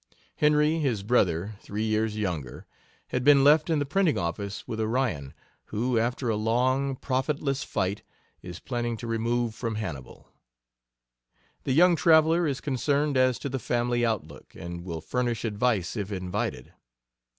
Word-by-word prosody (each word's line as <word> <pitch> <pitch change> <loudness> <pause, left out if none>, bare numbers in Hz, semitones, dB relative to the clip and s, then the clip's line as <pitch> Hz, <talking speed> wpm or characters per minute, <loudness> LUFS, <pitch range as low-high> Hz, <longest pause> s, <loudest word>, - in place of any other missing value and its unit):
Henry, 150 +1 +3
his 120 -10 -1
brother, 100 -3 +1
three 105 +2 -4
years 110 0 0
younger, 85 - -4 0.4
had 125 - -1
been 140 0 +6
left 150 +3 +5
in 160 - +2
the 145 - 0
printing 170 +2 +1
office 100 +4 -4
with 110 - -4
Orion, 110 - -1 0.3
who, 115 +2 0
after 120 +2 -1
a 110 - +1
long, 130 +5 +1
profitless 135 +1 -1
fight, 95 +2 -2 0.4
is 90 -1 -8
planning 120 -2 -3
to 120 - -8
remove 115 0 -1
from 115 0 -4
Hannibal. 85 -12 -7 1.4
The 130 - +1
young 175 +4 +6
traveler 160 +1 +4
is 140 -1 -2
concerned 145 +2 0
as 130 -1 +3
to - - -5
the 135 -1 -3
family 120 0 0
outlook, 110 -9 -3
and 85 +1 -7
will 85 -3 -5
furnish 120 +3 -2
advice 110 -3 0
if 105 -2 -4
invited. 95 +1 -4
120 Hz, 150 wpm, -27 LUFS, 105-135 Hz, 1.4 s, been